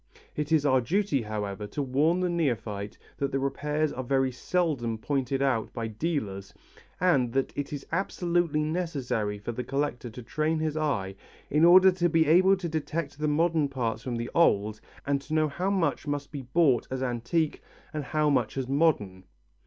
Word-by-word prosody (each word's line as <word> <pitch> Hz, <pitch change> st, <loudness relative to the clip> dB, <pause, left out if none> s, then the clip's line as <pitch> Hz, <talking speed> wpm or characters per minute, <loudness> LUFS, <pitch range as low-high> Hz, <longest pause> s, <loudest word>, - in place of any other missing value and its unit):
It 150 Hz, +1 st, -3 dB
is 155 Hz, -3 st, +3 dB
our 130 Hz, -2 st, +4 dB
duty, 175 Hz, -, 0 dB
however, 105 Hz, -1 st, -4 dB
to 145 Hz, +7 st, -3 dB
warn 150 Hz, +7 st, +2 dB
the 180 Hz, -, +1 dB
neophyte 115 Hz, -, -2 dB, 0.2 s
that 140 Hz, -1 st, -1 dB
repairs 150 Hz, +2 st, -1 dB
are 130 Hz, -, -4 dB
very 135 Hz, +1 st, +1 dB
seldom 130 Hz, -5 st, -1 dB
pointed 135 Hz, +2 st, -1 dB
out 125 Hz, -5 st, 0 dB
by 115 Hz, -2 st, -3 dB
dealers 110 Hz, -, -3 dB, 0.4 s
and 135 Hz, -10 st, +2 dB
that 135 Hz, 0 st, 0 dB
it 145 Hz, -1 st, -4 dB
is 145 Hz, -2 st, -5 dB
absolutely 175 Hz, -5 st, 0 dB
necessary 140 Hz, -11 st, -2 dB
for 105 Hz, +3 st, -5 dB
the 125 Hz, +2 st, -4 dB
collector 135 Hz, -1 st, -2 dB
to 120 Hz, +2 st, -10 dB
train 155 Hz, +6 st, -1 dB
his 155 Hz, -1 st, -1 dB
eye 125 Hz, -12 st, -1 dB, 0.4 s
in 150 Hz, +3 st, +3 dB
order 185 Hz, +2 st, +8 dB
to 175 Hz, -1 st, +1 dB
be 165 Hz, 0 st, +3 dB
able 185 Hz, +5 st, +5 dB
to 180 Hz, -2 st, -4 dB
detect 155 Hz, -2 st, -3 dB
the 155 Hz, -, 0 dB
modern 160 Hz, 0 st, +2 dB
parts 115 Hz, -5 st, -2 dB
from 120 Hz, 0 st, -4 dB
the 115 Hz, +1 st, -4 dB
old 110 Hz, -9 st, +2 dB, 0.2 s
and 140 Hz, 0 st, 0 dB
to 155 Hz, +3 st, -4 dB
know 155 Hz, -1 st, +3 dB
how 180 Hz, +6 st, -2 dB
much 170 Hz, -7 st, 0 dB
must 145 Hz, -1 st, -3 dB
be 145 Hz, -3 st, -5 dB
bought 130 Hz, -1 st, +2 dB
as 130 Hz, 0 st, -3 dB
antique 125 Hz, +6 st, -1 dB, 0.3 s
and 150 Hz, -2 st, -3 dB
how 155 Hz, +3 st, +1 dB
much 125 Hz, -5 st, +1 dB
as 130 Hz, -2 st, -2 dB
modern. 130 Hz, -, +1 dB
140 Hz, 180 wpm, -28 LUFS, 120-160 Hz, 0.4 s, order